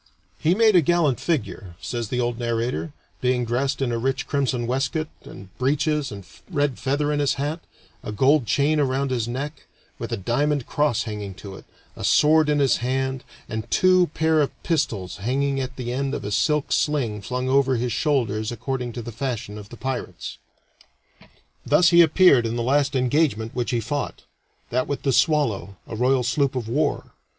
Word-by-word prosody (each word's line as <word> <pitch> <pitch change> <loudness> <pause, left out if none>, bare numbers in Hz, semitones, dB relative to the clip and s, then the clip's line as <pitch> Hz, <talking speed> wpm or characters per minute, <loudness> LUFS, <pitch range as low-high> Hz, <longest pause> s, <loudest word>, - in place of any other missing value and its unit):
"He 165 +4 +2
made 220 -1 +4
a 175 - +7
gallant 160 -4 +2
figure," 120 - -3
says 120 -2 -4
the 125 - -1
old 120 -1 -1
narrator, 115 - -2 0.3
"being 125 -1 +1
dressed 130 +4 -1
in 125 - 0
a 115 - -1
rich 135 +3 -1
crimson 130 -4 -1
waistcoat 140 +6 -1 0.2
and 95 -1 -12
breeches 145 +2 0
and 100 -2 -8 0.2
red 145 -6 0
feather 145 +2 0
in 145 - 0
his 145 -2 +1
hat, 145 +4 -2 0.4
a - - -6
gold 130 +4 +3
chain 150 +6 +2
around 135 -1 0
his 120 -3 -1
neck, 140 +5 -5 0.3
with - - -5
a - - -1
diamond 135 +7 0
cross 145 -6 +1
hanging 105 -3 -6
to 95 0 -9
it, - - -13 0.3
a - - -8
sword 150 +9 +4
in 150 - +2
his 140 -2 +3
hand, 130 +1 -2 0.2
and 110 -1 -5
two 185 -1 +4
pair 160 -1 +3
of 145 - +1
pistols 110 - -1
hanging 135 +6 0
at 130 -1 -4
the 125 -1 -4
end 135 +1 -1
of - - -5
a 105 - -3
silk 150 +7 +1
sling 125 -9 0
flung 125 +5 -3
over 135 0 +3
his 120 0 -1
shoulders 115 -8 0
according 125 +1 -3
to 120 - -6
the 120 - -6
fashion 115 -3 -4
of 105 -1 -10
the 120 - -11
pyrates." 130 +1 -5 1.2
Thus 175 -1 +4
he 170 0 +7
appeared 160 -7 +5
in 115 - -3
the 120 - -1
last 140 +2 +2
engagement 125 -4 +1
which 120 -1 -2
he 120 - +1
fought 135 +5 -4 0.5
that 125 +2 0
with 140 - -3
the 135 - +1
Swallow 120 - +1
a - - -7
royal 125 +2 +2
sloop 135 +3 +1
of 120 -4 -3
war. 145 +5 -1
130 Hz, 185 wpm, -23 LUFS, 120-145 Hz, 1.2 s, a